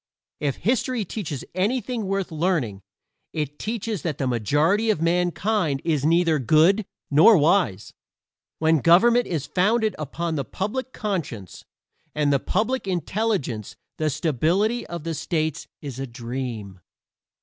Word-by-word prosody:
If 140 -3 -1
history 235 +2 0
teaches 165 - -5
anything 230 +3 -1
worth 195 -2 -2
learning 155 - -1 0.5
it 150 -2 -3
teaches 220 -4 -3
that 155 -5 -3
the 135 - -1
majority 145 - +2
of 210 - +2
mankind 175 -1 +1
is 155 -5 +1
neither 165 0 +3
good 160 - +4 0.2
nor 165 +9 +7
wise. 155 - +2 0.6
When 160 0 +3
government 230 - +5
is 155 -5 -2
founded 215 +4 +1
upon 160 +2 -3
the 140 - -1
public 210 - -4
conscience 155 - -4 0.5
and 145 -1 +2
the 140 - +3
public 225 - -1
intelligence 180 - -2 0.2
the 155 0 0
stability 175 - 0
of 170 -2 -6
states 155 -1 -2 0.2
is 135 -3 -6
a 135 - -3
dream. 115 -5 -6
165 Hz, 125 wpm, -24 LUFS, 145-205 Hz, 0.6 s, nor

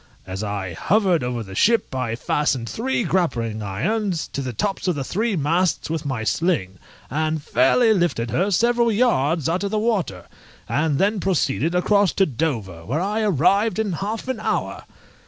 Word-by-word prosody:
As 95 +2 -5
I 100 -3 -3
hovered 185 - +2
over 125 -2 -2
the 95 -2 -10
ship 230 - +2
I 125 -3 -2
fastened 130 -1 0
three 240 - -1
grappling 120 - -1
irons 175 - -1
to 140 - -4
the 130 -2 -3
tops 195 - -2
of 180 - +1
the 140 - -3
three 210 - -1
masts 165 +2 0
with 155 -2 -3
my 125 -5 -2
sling, 110 - 0 0.3
and 155 +2 0
fairly 160 - +3
lifted 170 - 0
her 190 - +1
several 235 +4 +2
yards 165 - +2
out 175 +4 0
of 200 - -1
the 215 - -1
water, 200 - -1 0.4
and 150 -1 +1
then 205 +4 +1
proceeded 170 -3 0
across 200 +1 +3
to 195 - +3
Dover, 115 - -3
where 135 - -2
I 205 +4 -1
arrived 200 - +2
in 215 -4 -1
half 210 +8 -4
an 260 -4 -2
hour! - - -2
165 Hz, 175 wpm, -22 LUFS, 125-205 Hz, 0.4 s, fairly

